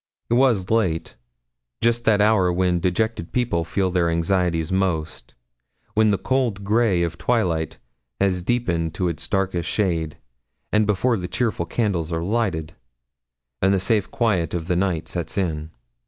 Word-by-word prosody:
It - - +4
was 120 -7 +3
late 95 -8 0 0.6
just 115 0 +1
that 105 -2 +4
hour 105 -4 +4
when 90 0 +1
dejected 90 +1 -1
people 120 -9 0
feel 95 +3 -1
their 90 -2 +2
anxieties 85 -1 0
most 85 -9 -2 0.6
when 110 0 +4
the 100 - +2
cold 120 -6 -1
grey 105 -4 +2
of 85 0 -3
twilight 85 -7 0 0.4
has 95 -2 +1
deepened 85 -7 -1
to 90 - 0
its 85 - -4
darkest 95 -4 -1
shade, 85 -7 -1 0.5
and 105 0 +3
before 110 +4 +2
the 90 -2 -4
cheerful 105 -8 -1
candles 90 -8 -1
are 80 0 -1
lighted, 95 -6 -1 0.9
and 95 - +4
the - - +1
safe 100 +2 +1
quiet 95 -9 0
of 85 -2 -3
the 90 - +1
night 90 -3 0
sets 85 +3 -4
in. 80 -5 -1
95 Hz, 155 wpm, -23 LUFS, 85-110 Hz, 0.9 s, It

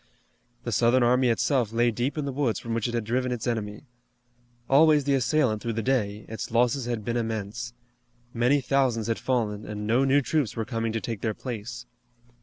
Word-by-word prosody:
The 120 - -3
Southern 120 +3 +3
army 125 +1 +3
itself 120 -1 +1
lay 120 +1 +2
deep 120 +7 -2
in 150 - -1
the 140 - -2
woods 130 -4 0
from 115 - -5
which 115 -1 0
it 120 - -3
had 115 - 0
driven 125 +3 -1
its 120 -3 -3
enemy. 110 -1 -3 0.8
Always 150 +1 +5
the 140 0 +1
assailant 125 -4 +1
through 115 - -2
the 115 0 -2
day, 105 -5 0
its 110 - -5
losses 120 +2 +1
had 115 -4 -3
been 120 0 -1
immense. 115 +1 -4 0.6
Many 125 +4 +2
thousands 130 -4 +1
had 115 -1 -1
fallen, 110 -5 -1
and 105 0 -5
no 120 +5 +3
new 135 +1 +3
troops 145 -6 0
were 115 - -2
coming 115 -1 -2
to 115 - -2
take 115 -4 -5
their 110 -2 -1
place. 120 0 -6
120 Hz, 200 wpm, -26 LUFS, 110-130 Hz, 0.8 s, Always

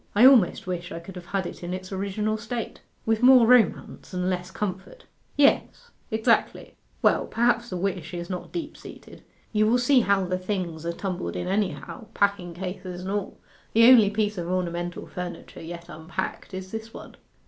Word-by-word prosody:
I 225 +5 +7
almost 250 -9 +6
wish 180 0 -4
I - - -5
could 175 +3 -11
have 180 -1 -9
had 195 -1 -1
it - - -7
in 175 +1 -3
its 185 +1 -8
original 200 +3 -1
state.' 230 +1 -5 0.2
'With 225 0 +1
more 250 -1 +8
romance 230 -5 +2
and 180 +1 0
less 180 0 -3
comfort.' 190 - -5 0.3
'Yes, 290 +11 +2 0.2
exactly. 220 -2 +1 0.3
Well, - - +3
perhaps 240 0 +1
the 185 - -3
wish 180 -3 -3
is 175 -1 -5
not 180 -2 -6
deep 320 -3 -5
seated. - - -12 0.3
You 215 0 +3
will 235 +3 +4
see 250 +2 +4
how 200 -4 +2
the 185 0 -2
things 180 -4 -3
are - - 0
tumbled 185 +1 -4
in 180 - -3
anyhow, 195 - -2
packing 200 -4 0
cases 180 0 -6
and 190 +1 -4
all. 205 -1 -3 0.4
The 230 +1 +7
only 225 -6 +7
piece 210 -1 -1
of 170 - -4
ornamental 175 -1 -2
furniture 180 -1 -7
yet 170 +1 -8
unpacked 185 +4 -5
is 190 0 -7
this 225 0 -7
one. - - -10
190 Hz, 180 wpm, -25 LUFS, 180-220 Hz, 0.4 s, more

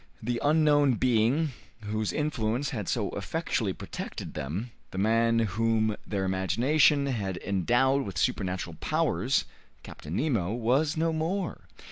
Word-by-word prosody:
The 120 +1 -1
unknown 145 -3 +4
being 125 +6 +2 0.3
whose 110 0 -2
influence 135 -3 -1
had 105 -7 -4
so - - -1
effectually - - -2
protected - - -7
them, 90 - -4 0.2
the - - -8
man 115 +3 +3
whom 110 0 +1
their 100 -2 -1
imagination 120 - +3
had 100 -9 -2
endowed 120 +9 +2
with 95 -3 -6
supernatural 90 -3 -1
powers, - - +1 0.4
Captain 75 +3 -8
Nemo, 110 - 0
was 135 +7 +1
no 165 +1 +1
more. 170 +4 -2
115 Hz, 125 wpm, -28 LUFS, 100-145 Hz, 0.4 s, unknown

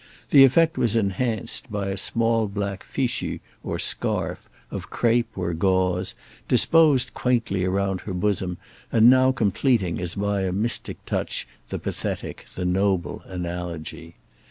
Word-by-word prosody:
This 135 -1 +9
effect 165 +5 +2
was 115 -2 +2
enhanced 110 +3 0
by 100 -2 -2
a 95 - -2
small 115 +2 +1
black 100 -1 -4
fichu 130 -3 -2 0.2
or - - -4
scarf, - - 0 0.2
of - - -6
crape 120 0 +1
or 85 -2 -2
gauze, 90 +1 +1 0.3
disposed 155 -6 +4
quaintly 115 -7 0
round 95 0 -1
her 95 - -6
bosom 95 -2 -1 0.3
and 115 +2 +7
now 130 0 +5
completing 105 -5 +1
as 85 -2 -3
by 100 0 -1
a 95 -1 -1
mystic 105 +6 0
touch - - -2 0.2
the - - -3
pathetic, - - -4
the 90 - -3
noble 95 0 0
analogy. 85 -2 -6
100 Hz, 135 wpm, -24 LUFS, 90-120 Hz, 0.3 s, This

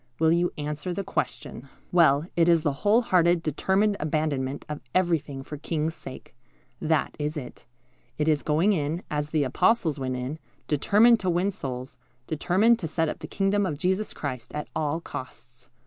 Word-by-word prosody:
Will 160 0 +3
you 175 +1 +2
answer 150 +4 -4
the 200 - -2
question?" 135 -6 -4 0.2
Well, 155 -4 +4
it 170 0 +4
is 165 -2 +4
the 145 -4 +1
whole 215 +4 +4
hearted, 175 -4 +3
determined 190 +7 +1
abandonment 150 -3 -1
of 150 -1 -5
everything 160 -7 0
for 150 - -7
the - - -20
King's 160 0 -1
sake. 130 - -10 0.5
That 160 -1 +1
is 150 +1 -2
it. 125 -4 -9 0.5
It 150 - 0
is 150 -2 +3
going 160 +7 +2
in, 160 +1 -2
as 150 0 -1
the 155 -2 +1
Apostles 155 - +2
went 130 -1 -2
in, 130 +5 -4 0.3
determined 215 - +4
to 185 - -1
win 180 +3 +1
souls, 130 -6 -6 0.3
determined 190 - +2
to 165 - -3
set 160 0 0
up - - -5
the - - -7
kingdom 200 +1 +1
of 160 -7 -2
Jesus 190 +6 0
Christ, 130 -4 -6
at 150 - -4
all 155 +2 -1
costs. 125 -4 -10
155 Hz, 180 wpm, -26 LUFS, 145-180 Hz, 0.5 s, Well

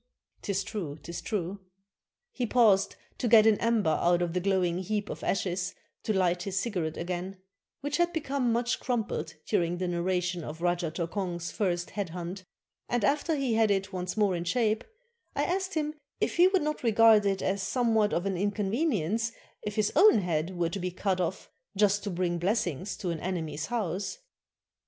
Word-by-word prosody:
['T - - -3
is 195 +1 0
true, 190 -8 -5
't 170 - -7
is 170 - -5
true.] 200 -2 -3 0.7
He 250 - -2
paused 215 -5 +4 0.2
to 245 - 0
get 220 -2 +7
an 220 -2 +5
ember 225 -8 +2
out 175 0 +3
of 170 -1 -2
the 180 - +1
glowing 180 -2 +1
heap 210 +2 -2
of - - -7
ashes 185 -1 -1 0.3
to - - -1
hght 180 -3 +2
his 195 0 -3
cigarette 185 -7 -1
again, 180 +2 -4 0.4
which 290 +1 -1
had 345 0 +2
become 275 -6 0
much 240 +1 0
crumpled 240 -4 -2
during 175 -4 +1
the 180 0 -2
narra 175 +1 0
tion 180 -1 -3
of 155 +2 -7
Rajah 175 -1 0
Tokong's 170 +1 -3
first 175 -4 -1
head 200 -4 -3
hunt, 180 +2 -6 0.5
and 240 -4 +1
after 295 +4 +1
he 270 -5 0
had 225 -1 +3
it 195 -1 0
once 180 +1 -3
more 205 -4 +3
in 170 - -2
shape, 215 +3 +1 0.5
I - - +1
asked 380 +1 -1
him 305 -1 0 0.3
if - - 0
he 350 +2 +7
would 380 -3 +2
not 305 0 -2
regard 225 -2 +6
it 195 -1 0
as 195 +1 0
somewhat 225 -1 +2
of 175 - 0
an 195 -1 0
inconvenience 210 - 0 0.3
if 210 -1 -5
his 215 -1 +1
own 415 - +7
head 175 0 -1
were 170 -1 +1
to 195 - -4
be 180 0 -2
cut 185 +1 -1
off, 180 +2 -3 0.3
just 205 0 +3
to - - -1
bring 175 -1 -1
blessings 185 - -1
to 180 - -2
an 165 - -3
enemy's 160 -4 -3
house. 205 - -2
195 Hz, 190 wpm, -29 LUFS, 175-225 Hz, 0.7 s, get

